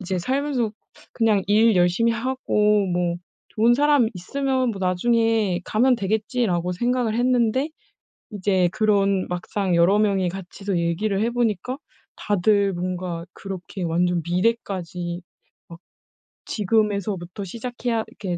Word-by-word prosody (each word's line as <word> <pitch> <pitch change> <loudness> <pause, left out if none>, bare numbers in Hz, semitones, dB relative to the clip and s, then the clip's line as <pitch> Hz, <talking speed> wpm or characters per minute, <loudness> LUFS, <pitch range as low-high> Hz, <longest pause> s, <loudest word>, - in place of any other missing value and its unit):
이제 185 -1 -2
살면서 260 +2 -1 0.4
'그냥 215 -4 +2
일 215 +2 +4
열심히 180 +7 +3
하고 210 -4 +1
뭐 175 -1 0 0.3
좋은 230 +2 +3
사람 290 -3 +3
있으면 260 +6 -1
뭐 200 - -6
나중에 210 0 +1
가면 250 +3 +3
되겠지.'라고 205 -3 -1
생각을 240 +3 0
했는데 250 +3 +1 0.6
이제 190 -3 +1
그런 200 -3 +2
막상 180 +1 -2
여러 175 +5 +4
명이 195 -4 +2
같이서 195 +1 -4
얘기를 185 +4 0
해 230 - +1
보니까 240 +2 -1 0.4
다들 200 0 +2
뭔가 180 -1 -4
그렇게 190 0 -7
완전 175 +1 +1
미래까지 180 -2 -2 0.5
막 170 - -11 0.7
지금에서부터 200 -3 -1
시작해야 235 +2 -3
이렇게 180 -4 -5
205 Hz, 280 characters per minute, -23 LUFS, 180-230 Hz, 0.7 s, 일